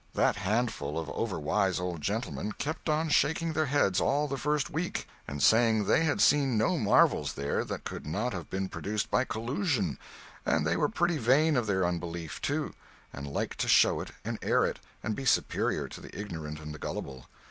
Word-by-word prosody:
That -, -, +3 dB
handful 105 Hz, -8 st, -1 dB
of 80 Hz, -1 st, -3 dB
overwise 95 Hz, -1 st, 0 dB
old 90 Hz, -3 st, -3 dB
gentlemen 105 Hz, +2 st, -2 dB
kept 160 Hz, +2 st, -4 dB
on 155 Hz, +1 st, +1 dB
shaking 160 Hz, +3 st, +2 dB
their 155 Hz, -1 st, +1 dB
heads 130 Hz, -9 st, +2 dB
all 145 Hz, +2 st, +2 dB
the 140 Hz, -, -2 dB
first 150 Hz, +4 st, 0 dB
week, 165 Hz, +3 st, -3 dB, 0.2 s
and 70 Hz, 0 st, -3 dB
saying 110 Hz, -1 st, +5 dB
they 160 Hz, -, +3 dB
had 155 Hz, -, +1 dB
seen 135 Hz, -5 st, +4 dB
no 150 Hz, +11 st, +2 dB
marvels 105 Hz, -, +3 dB
there 70 Hz, +1 st, -1 dB
that -, -, -5 dB
could -, -, -6 dB
not 105 Hz, +10 st, -1 dB
have 85 Hz, -4 st, -6 dB
been 95 Hz, 0 st, -2 dB
produced 105 Hz, +2 st, -3 dB
by 130 Hz, -, +3 dB
collusion; 115 Hz, -, -1 dB, 0.4 s
and 75 Hz, -, +1 dB
they 80 Hz, +2 st, +1 dB
were -, -, +1 dB
pretty 175 Hz, -6 st, +1 dB
vain 140 Hz, +6 st, +4 dB
of 120 Hz, -4 st, +1 dB
their 95 Hz, -3 st, +2 dB
unbelief, 85 Hz, -2 st, -4 dB
too, -, -, -1 dB, 0.4 s
and 70 Hz, +1 st, -6 dB
liked 70 Hz, -, -3 dB
to -, -, 0 dB
show -, -, +5 dB
it -, -, -7 dB, 0.2 s
and -, -, -3 dB
air -, -, +3 dB
it, -, -, -3 dB, 0.2 s
and 110 Hz, 0 st, -1 dB
be 135 Hz, -, -5 dB
superior 135 Hz, -, +1 dB
to -, -, -9 dB
the -, -, -10 dB
ignorant 80 Hz, -7 st, -5 dB
and 75 Hz, -1 st, -7 dB
the 75 Hz, -, -9 dB
gullible. 65 Hz, -2 st, -6 dB
110 Hz, 195 wpm, -29 LUFS, 85-145 Hz, 0.4 s, saying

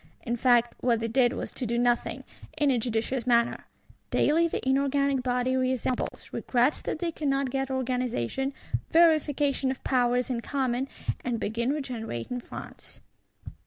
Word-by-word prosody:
In 240 Hz, -1 st, -1 dB
fact, 240 Hz, -1 st, +3 dB
what 235 Hz, -2 st, +2 dB
they 230 Hz, -, -1 dB
did 245 Hz, +1 st, +3 dB
was -, -, -5 dB
to 250 Hz, -, -3 dB
do 235 Hz, +1 st, 0 dB
nothing, 240 Hz, 0 st, +1 dB, 0.3 s
in 295 Hz, -2 st, +3 dB
a 250 Hz, -, +2 dB
judicious 235 Hz, +2 st, -2 dB
manner. 235 Hz, -1 st, +2 dB, 0.4 s
Daily 330 Hz, +3 st, +3 dB
the 315 Hz, -, -4 dB
inorganic 275 Hz, 0 st, +2 dB
body 250 Hz, 0 st, 0 dB
reassembles; 255 Hz, -1 st, -1 dB
regrets 250 Hz, +4 st, +1 dB
that -, -, -3 dB
they 335 Hz, +1 st, -2 dB
cannot 275 Hz, -4 st, -1 dB
get 270 Hz, 0 st, -1 dB
organisation, 255 Hz, -, -1 dB, 0.4 s
"verification 295 Hz, -5 st, +3 dB
of 260 Hz, -, -4 dB
powers 250 Hz, 0 st, +1 dB
in 235 Hz, -2 st, -1 dB
common, 260 Hz, -1 st, -1 dB, 0.4 s
and 240 Hz, -2 st, -1 dB
begin 230 Hz, +4 st, -1 dB
regenerating 245 Hz, -, -4 dB
France. -, -, -10 dB
255 Hz, 145 wpm, -27 LUFS, 240-275 Hz, 0.4 s, fact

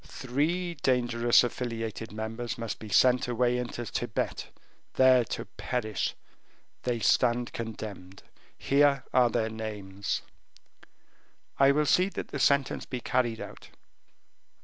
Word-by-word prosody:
"Three 160 Hz, +8 st, -2 dB
dangerous 120 Hz, -5 st, +3 dB
affiliated 115 Hz, -2 st, -4 dB
members 115 Hz, +3 st, -4 dB
must 115 Hz, -2 st, -4 dB
be 110 Hz, -, -9 dB
sent 125 Hz, +4 st, +4 dB
away 125 Hz, 0 st, +1 dB
into 120 Hz, -1 st, -4 dB
Tibet, -, -, -3 dB, 0.5 s
there 130 Hz, -1 st, +6 dB
to -, -, -5 dB
perish; 110 Hz, -4 st, -3 dB, 0.7 s
they 120 Hz, -1 st, -1 dB
stand 120 Hz, +1 st, +2 dB
condemned. 105 Hz, -5 st, -7 dB, 0.3 s
Here 140 Hz, 0 st, +3 dB
are 125 Hz, -1 st, +5 dB
their 110 Hz, -1 st, -1 dB
names." 100 Hz, -3 st, -4 dB, 1.4 s
"I 135 Hz, 0 st, +6 dB
will 150 Hz, +2 st, +2 dB
see 185 Hz, +6 st, +3 dB
that -, -, -6 dB
the 140 Hz, -, -5 dB
sentence 140 Hz, 0 st, +2 dB
be 125 Hz, -, -4 dB
carried 120 Hz, -1 st, 0 dB
out." -, -, -9 dB
120 Hz, 120 wpm, -28 LUFS, 110-130 Hz, 1.4 s, there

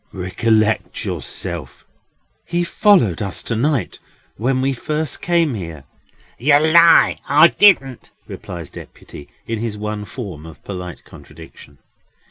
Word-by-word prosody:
"Recollect 110 Hz, +4 st, 0 dB
yourself." 85 Hz, -8 st, -6 dB, 0.6 s
"He 175 Hz, 0 st, -2 dB
followed 175 Hz, -, +2 dB
us 100 Hz, -2 st, -4 dB
to 115 Hz, -, -3 dB
night, 125 Hz, -, -1 dB, 0.4 s
when 130 Hz, +4 st, -1 dB
we 135 Hz, +1 st, 0 dB
first 150 Hz, +2 st, -4 dB
came 170 Hz, -4 st, +1 dB
here!" 85 Hz, -, -7 dB, 0.6 s
"Yer 145 Hz, +3 st, +4 dB
lie, 165 Hz, +2 st, +5 dB
I 150 Hz, +4 st, +6 dB
didn't!" 135 Hz, -, +3 dB, 0.2 s
replies 85 Hz, -4 st, -9 dB
Deputy, 70 Hz, -, -12 dB, 0.2 s
in 115 Hz, -1 st, -4 dB
his 110 Hz, -2 st, -4 dB
one 105 Hz, 0 st, -5 dB
form 90 Hz, -, -8 dB
of 80 Hz, -, -14 dB
polite 90 Hz, -3 st, -8 dB
contradiction. 70 Hz, -, -15 dB
115 Hz, 120 wpm, -19 LUFS, 90-150 Hz, 0.6 s, I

